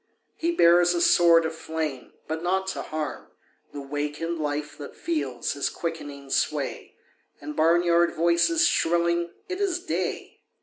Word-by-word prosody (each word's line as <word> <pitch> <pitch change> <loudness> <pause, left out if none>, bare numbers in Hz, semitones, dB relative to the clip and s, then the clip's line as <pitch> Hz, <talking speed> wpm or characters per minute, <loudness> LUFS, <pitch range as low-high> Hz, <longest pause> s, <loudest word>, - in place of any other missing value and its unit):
He 335 - -1
bears 175 - +5
a - - +1
sword 170 -1 +5
of 160 - -2
flame 160 -4 -5
but 160 +1 -3
not 190 +2 0
to - - -4
harm 155 -1 -5 0.4
The 145 - -7
wakened 150 +4 -3
life 145 -1 -3
that 145 - -9
feels 140 -7 -2
his 140 - -1
quickening 145 -5 -6
sway - - -2 0.4
And 300 -1 -7
barnyard 170 +1 +3
voices 170 - +3
shrilling 170 - +1 0.2
"It 370 +2 -4
is 380 -3 +1
day!" 370 - -4
165 Hz, 140 wpm, -25 LUFS, 150-175 Hz, 0.4 s, bears